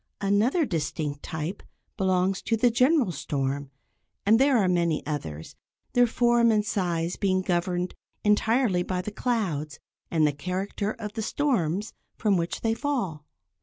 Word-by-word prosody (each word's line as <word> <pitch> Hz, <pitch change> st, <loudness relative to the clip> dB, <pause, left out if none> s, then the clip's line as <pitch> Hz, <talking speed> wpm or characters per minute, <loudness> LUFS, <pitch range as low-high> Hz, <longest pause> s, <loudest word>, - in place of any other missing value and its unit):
Another 215 Hz, -, +2 dB
distinct 150 Hz, -, -3 dB
type 160 Hz, +4 st, -4 dB, 0.3 s
belongs 190 Hz, -1 st, +1 dB
to 225 Hz, -, 0 dB
the 240 Hz, +2 st, +4 dB
general 255 Hz, -, +3 dB
storm, 140 Hz, -2 st, -2 dB, 0.6 s
and 220 Hz, +3 st, +5 dB
there 270 Hz, -1 st, +4 dB
are 200 Hz, -4 st, +3 dB
many 170 Hz, -3 st, +1 dB
others, 80 Hz, -, -5 dB, 0.4 s
their 245 Hz, 0 st, +5 dB
form 240 Hz, 0 st, +3 dB
and 210 Hz, -2 st, +2 dB
size 175 Hz, -4 st, -1 dB
being 185 Hz, -2 st, +1 dB
governed 180 Hz, 0 st, -1 dB, 0.3 s
entirely 215 Hz, -1 st, +3 dB
by 180 Hz, 0 st, -2 dB
the 210 Hz, -, -5 dB
clouds 180 Hz, -, -2 dB, 0.3 s
and 160 Hz, -2 st, +3 dB
the 150 Hz, -, +2 dB
character 185 Hz, +7 st, -3 dB
of 210 Hz, -3 st, -7 dB
the 220 Hz, -, -3 dB
storms 210 Hz, -, 0 dB, 0.2 s
from 210 Hz, -4 st, +2 dB
which 170 Hz, -1 st, -2 dB
they 225 Hz, -1 st, +1 dB
fall. 225 Hz, -, -2 dB
190 Hz, 145 wpm, -26 LUFS, 165-225 Hz, 0.6 s, and